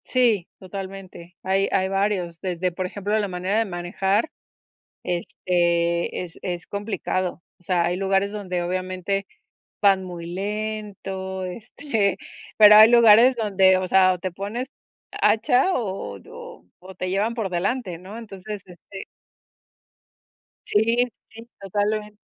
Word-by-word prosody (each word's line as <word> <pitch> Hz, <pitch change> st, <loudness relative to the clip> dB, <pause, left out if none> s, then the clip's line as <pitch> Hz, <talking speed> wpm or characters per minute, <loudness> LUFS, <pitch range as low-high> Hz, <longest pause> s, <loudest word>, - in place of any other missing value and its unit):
Sí, 230 Hz, -8 st, +2 dB
totalmente. 190 Hz, -2 st, -9 dB
Hay, 195 Hz, +1 st, +1 dB
hay 190 Hz, -1 st, +2 dB
varios, 195 Hz, -4 st, -1 dB
desde, 180 Hz, -1 st, -2 dB
por 185 Hz, +2 st, -4 dB
ejemplo, 205 Hz, +3 st, -2 dB
la 205 Hz, -, -1 dB
manera 185 Hz, +3 st, -1 dB
de 225 Hz, -, +1 dB
manejar, 190 Hz, -, -1 dB, 0.7 s
este, 170 Hz, -1 st, 0 dB
es 170 Hz, -2 st, -10 dB
es 175 Hz, -2 st, -5 dB
complicado. 195 Hz, -3 st, -3 dB, 0.2 s
O -, -, -23 dB
sea, 175 Hz, -1 st, +1 dB
hay 175 Hz, +1 st, 0 dB
lugares 195 Hz, +1 st, +1 dB
donde, 185 Hz, -4 st, -3 dB
obviamente, 185 Hz, +2 st, -2 dB, 0.6 s
van 195 Hz, -2 st, +4 dB
muy 175 Hz, -2 st, -7 dB
lento, 195 Hz, -1 st, -4 dB
este, 215 Hz, +2 st, -2 dB, 0.4 s
pero 210 Hz, -1 st, +9 dB
hay 220 Hz, +1 st, +9 dB
lugares 235 Hz, +2 st, +7 dB
donde, 195 Hz, -4 st, +4 dB
o 185 Hz, 0 st, -1 dB
sea, 185 Hz, -1 st, +5 dB
o -, -, -8 dB
te 185 Hz, +1 st, -4 dB
pones 205 Hz, +8 st, -5 dB, 0.4 s
hacha 245 Hz, +10 st, +3 dB
o 195 Hz, -, -3 dB
o -, -, -11 dB
o 85 Hz, -, -11 dB
o 190 Hz, +1 st, -12 dB
te 185 Hz, 0 st, -4 dB
llevan 205 Hz, +5 st, 0 dB
por 220 Hz, -5 st, -3 dB
delante, 185 Hz, +1 st, -2 dB
¿no? 190 Hz, +5 st, -10 dB
Entonces, 210 Hz, -2 st, -8 dB
este 190 Hz, +2 st, -11 dB, 1.6 s
Sí, 230 Hz, +4 st, +2 dB, 0.2 s
sí, 225 Hz, +1 st, -13 dB
totalmente. 210 Hz, +2 st, -2 dB
195 Hz, 135 wpm, -23 LUFS, 180-210 Hz, 1.6 s, pero